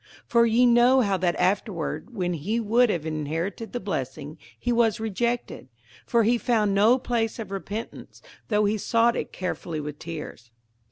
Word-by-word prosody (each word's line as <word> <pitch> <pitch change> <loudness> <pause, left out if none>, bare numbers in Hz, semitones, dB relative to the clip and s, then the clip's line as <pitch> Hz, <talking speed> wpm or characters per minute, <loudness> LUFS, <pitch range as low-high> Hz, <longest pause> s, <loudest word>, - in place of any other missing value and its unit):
58:012:017 - - -42
For 235 -1 +5
ye 235 +2 +4
know 245 +2 +5
how 200 -4 +1
that 175 -1 0
afterward, 185 -3 -1
when 180 -3 -1
he 190 +9 -2
would 235 +2 +3
have 170 -6 -1
inherited 160 +8 -3
the 245 - -3
blessing, 150 -4 -5 0.2
he 245 - -1
was 230 -2 +2
rejected: 230 - -2 0.4
for 235 -1 +3
he 235 +2 +2
found 215 -5 +1
no 215 +6 +5
place 235 -3 -1
of 215 -5 -7
repentance, 205 +3 -7 0.2
though 210 -1 +2
he 210 +1 0
sought 230 +2 +2
it - - -4
carefully 175 -3 -4
with 150 0 -6
tears. 150 -7 -8
210 Hz, 170 wpm, -25 LUFS, 170-235 Hz, 0.4 s, For